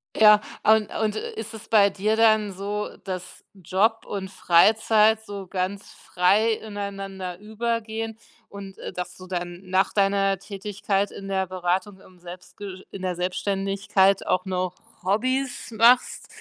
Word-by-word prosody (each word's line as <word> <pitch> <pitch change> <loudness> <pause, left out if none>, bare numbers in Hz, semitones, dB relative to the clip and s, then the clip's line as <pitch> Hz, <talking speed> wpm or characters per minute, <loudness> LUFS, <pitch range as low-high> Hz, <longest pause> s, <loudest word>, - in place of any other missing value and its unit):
Ja, 210 -1 +7 0.2
und 215 -1 +4
und 215 -1 0
ist 220 0 -5
es 220 0 -10
bei 205 -2 +6
dir 205 +3 0
dann 215 -2 +4
so, 205 +2 -4 0.2
dass 185 -2 -6
Job 200 +4 0
und 195 -2 -5
Freizeit 215 +4 +4
so 200 -3 -7
ganz 190 +2 -3
frei 200 +5 +2
ineinander 195 -4 -6
übergehen 225 +1 -3 0.3
und, 195 -1 -10
äh, - - -7
dass 180 0 -5
du 185 - -11
dann 175 -1 -5
nach 190 +1 +1
deiner 195 -1 +2
Tätigkeit 200 0 -2
in 195 - -9
der 190 -1 0
Beratung 185 +2 -2
im 185 -2 -19
Selbstge 185 +2 -10
in 195 - -8
der 180 -1 -1
Selbstständigkeit 195 +1 +1
auch 185 +1 +1
noch 185 -1 -2 0.3
Hobbys 255 +7 -1
machst? 235 +3 +4
195 Hz, 140 wpm, -24 LUFS, 185-215 Hz, 0.3 s, Ja